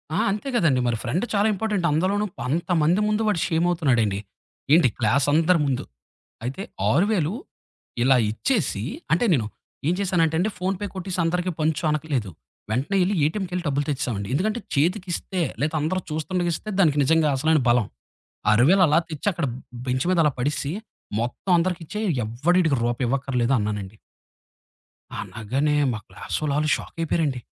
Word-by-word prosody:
ఆ! -, -, +1 dB
అంతే 210 Hz, +7 st, -3 dB
కదండీ. 155 Hz, -, +3 dB
మరి 120 Hz, -1 st, 0 dB
ఫ్రెండ్ 155 Hz, -, -1 dB
చాలా 205 Hz, +1 st, +3 dB
ఇంపార్టెంట్. 205 Hz, -3 st, -1 dB
అందులోనూ 190 Hz, +7 st, +1 dB, 0.2 s
అంతమంది 165 Hz, +4 st, +1 dB
ముందు 215 Hz, +1 st, +1 dB
వాడు 210 Hz, -5 st, +1 dB
షేమవుతున్నాడండి. 155 Hz, -, +1 dB, 0.5 s
ఏంటి 165 Hz, -4 st, +6 dB
క్లాసందరి 145 Hz, -, +3 dB
ముందు. 135 Hz, -3 st, -1 dB, 0.6 s
అయితే 135 Hz, +10 st, -4 dB, 0.3 s
6000 180 Hz, -3 st, +2 dB, 0.7 s
ఇలా 130 Hz, +1 st, +5 dB, 0.2 s
ఇచ్చేసి 155 Hz, -, -1 dB, 0.3 s
అంటే 170 Hz, +8 st, +3 dB
నేను, 120 Hz, -9 st, +2 dB, 0.4 s
ఏం 175 Hz, -, +3 dB
చేశానంటే 175 Hz, -5 st, +1 dB
అండి 195 Hz, +6 st, +1 dB
ఫోన్‌పే 190 Hz, +2 st, -2 dB
కొట్టసి 185 Hz, -1 st, -5 dB
అందరికిీ 180 Hz, +2 st, 0 dB
పంచు 155 Hz, 0 st, 0 dB
అనట్లేదు. 150 Hz, -9 st, -1 dB, 0.4 s
వెంటనే 135 Hz, -, 0 dB
వెళ్లి 190 Hz, +3 st, +1 dB
ఏటీఎంకెళ్ళి 180 Hz, +2 st, -2 dB
డబ్బులు 145 Hz, 0 st, 0 dB
తెచ్చేసామండి. 125 Hz, -8 st, -2 dB
ఎందుకంటే 215 Hz, +9 st, 0 dB
చేతికిస్తే 180 Hz, +4 st, -1 dB, 0.2 s
లేదా 150 Hz, +2 st, 0 dB
అందరూ 160 Hz, +5 st, 0 dB
చూస్తుండకి 175 Hz, +3 st, -1 dB
ఇస్తే 215 Hz, -, -7 dB
దానికి 155 Hz, -6 st, +4 dB
నిజంగా 160 Hz, +2 st, +3 dB
అసలైన 155 Hz, +3 st, +3 dB
బలం. 120 Hz, -3 st, +3 dB, 0.7 s
6000 145 Hz, -, +5 dB
అలా 150 Hz, -, +4 dB
తెచ్చి 155 Hz, +4 st, -5 dB
అక్కడ 170 Hz, -3 st, -1 dB, 0.4 s
బెంచ్ 130 Hz, +2 st, 0 dB
మీద 180 Hz, -, +2 dB
అలా 150 Hz, -, +3 dB
పడేసి 145 Hz, +2 st, -1 dB, 0.5 s
మొత్తం 120 Hz, +10 st, -2 dB
అందరికి 175 Hz, 0 st, 0 dB
ఇచ్చేయి 210 Hz, +6 st, -3 dB, 0.2 s
ఎవ్వడ 120 Hz, +11 st, 0 dB
ఈడికి 155 Hz, -6 st, +2 dB
రూపాయి 120 Hz, +1 st, 0 dB
ఇవ్వక్కర్లేదు 135 Hz, -2 st, 0 dB
అన్నానండి. 105 Hz, -1 st, -3 dB, 1.3 s
అనగానే 135 Hz, +7 st, -1 dB, 0.2 s
మా 110 Hz, -, -4 dB
క్లాస్ -, -, -6 dB
వాళ్ళు 150 Hz, -2 st, 0 dB
ఆళ్ళు 155 Hz, 0 st, +1 dB
షాకయిపోయారండి. 160 Hz, -5 st, -2 dB
155 Hz, 145 wpm, -24 LUFS, 130-180 Hz, 1.3 s, ఏంటి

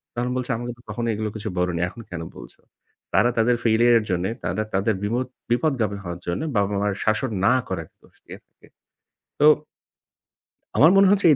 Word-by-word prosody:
তখন 120 Hz, +1 st, -1 dB
বলছে 125 Hz, 0 st, -2 dB
"আমাকে 120 Hz, +1 st, -5 dB
তো -, -, -19 dB
কখনোই 120 Hz, -1 st, -2 dB
এগুলো 110 Hz, 0 st, -2 dB
কিছু 110 Hz, 0 st, -4 dB
বলোনি, 90 Hz, -1 st, 0 dB
এখন 115 Hz, -, -11 dB
কেন 85 Hz, -2 st, -5 dB, 0.2 s
বলছো?" -, -, -13 dB, 0.5 s
তারা 120 Hz, -, +4 dB
তাদের 120 Hz, +2 st, +3 dB
failure 115 Hz, +1 st, +4 dB
এর -, -, -5 dB
জন্যে, 90 Hz, +1 st, 0 dB
তারা 85 Hz, +5 st, -1 dB
তাদের 100 Hz, +3 st, +1 dB
বিমোদ 120 Hz, +5 st, -1 dB, 0.2 s
বিপদগামী 120 Hz, -6 st, +1 dB
হওয়ার 85 Hz, -1 st, -6 dB
জন্যে 85 Hz, -, -2 dB
বাবা-মার 100 Hz, 0 st, +1 dB
শাসন 110 Hz, +4 st, 0 dB
না 125 Hz, -, +5 dB
করা 90 Hz, -3 st, -3 dB, 0.2 s
দোষ -, -, -23 dB
দিয়ে -, -, -10 dB
থাকে। -, -, -24 dB, 0.7 s
তো 145 Hz, -, +6 dB, 1.3 s
আমার 160 Hz, +4 st, +7 dB
মনে 195 Hz, 0 st, +7 dB
হচ্ছে 200 Hz, -2 st, +3 dB
এই -, -, +5 dB
110 Hz, 180 wpm, -23 LUFS, 100-120 Hz, 1.3 s, আমার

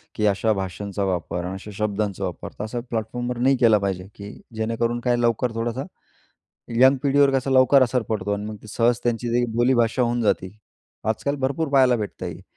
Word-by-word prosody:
की 105 Hz, -, 0 dB
अशा 105 Hz, +2 st, +2 dB
भाषांचा 100 Hz, +1 st, -4 dB
वापर 90 Hz, -2 st, -2 dB
आणि 90 Hz, -, -4 dB
अशा 95 Hz, +2 st, -8 dB
शब्दांचा 105 Hz, -2 st, -2 dB
वापर, -, -, -5 dB
तर -, -, -2 dB
असा 115 Hz, +3 st, -4 dB
प्लॅटफॉर्मवर 120 Hz, +2 st, -3 dB
नाही 130 Hz, +2 st, +3 dB
केला 115 Hz, -3 st, +5 dB
पाहिजे, 95 Hz, -1 st, -3 dB
की 100 Hz, +1 st, -9 dB, 0.2 s
जेणेकरून, 115 Hz, +2 st, -1 dB
काय, 120 Hz, 0 st, +1 dB
लवकर 120 Hz, 0 st, +1 dB
थोडासा 120 Hz, +3 st, -2 dB, 1.0 s
यंग 135 Hz, +1 st, +7 dB
पिढीवर 140 Hz, 0 st, +4 dB
कसा 135 Hz, +1 st, -5 dB
लवकर 130 Hz, +1 st, +6 dB
असर 125 Hz, 0 st, 0 dB
पडतो 105 Hz, -2 st, -1 dB
आणि 100 Hz, +1 st, -4 dB
मग 110 Hz, 0 st, -5 dB
ते 110 Hz, -, -12 dB
सहज 115 Hz, +3 st, +1 dB
त्यांची 120 Hz, +1 st, 0 dB
बोलीभाषा 120 Hz, 0 st, +2 dB
होऊन 120 Hz, 0 st, +1 dB
जाते, 105 Hz, -2 st, -1 dB, 0.5 s
आजकाल 110 Hz, +6 st, -1 dB
भरपूर 140 Hz, +4 st, -1 dB
पहायला 130 Hz, -3 st, +4 dB
भेटत 105 Hz, -3 st, -5 dB
आहे. -, -, -6 dB
115 Hz, 180 wpm, -23 LUFS, 105-125 Hz, 1.0 s, यंग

